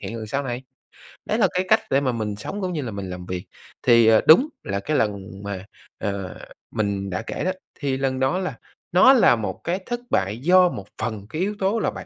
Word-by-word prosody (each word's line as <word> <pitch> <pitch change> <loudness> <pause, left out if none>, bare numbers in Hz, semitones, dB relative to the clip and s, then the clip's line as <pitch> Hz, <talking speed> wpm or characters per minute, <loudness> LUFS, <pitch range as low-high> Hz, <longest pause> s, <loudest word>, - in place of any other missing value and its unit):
hiện 115 - -6
lần 110 - -6
sau 140 +6 -1
này. 125 -1 -4 0.6
Đấy - - 0
là - - +4
cái 185 +1 0
cách 220 0 +6
để 135 - +4
mà 130 -3 +1
mình 110 -3 -3
sống, 195 - -6
cũng 180 -1 -2
như 150 - -2
là 120 -4 -4
mình 100 -2 -5
làm 90 0 -7
việc, 90 -1 -5 0.4
thì, 115 -2 +6
ờ, 110 -1 +6
đúng 250 - +7
là 100 0 -2
cái 150 +8 -1
lần 100 -2 -2
mà, 100 -1 -5 0.3
ờ, 100 -2 -4 0.3
mình 100 -2 -1
đã 90 - -2
kể - - -3
đó, 185 - +2 0.3
thì 135 -3 -1
lần 130 -1 -1
đó 135 +7 +1
là 185 - -3 0.4
nó 185 +10 +7
là 230 - +6
một 110 - -4
cái 180 +3 -1
thất 240 0 -3
bại 95 +3 +1
do 180 +5 +5
một 100 - -7
phần 110 -3 -4
cái 155 - -3
yếu 205 +2 -1
tố 200 +4 +1
là - - 0
bản - - -8
120 Hz, 240 wpm, -23 LUFS, -, 0.6 s, đúng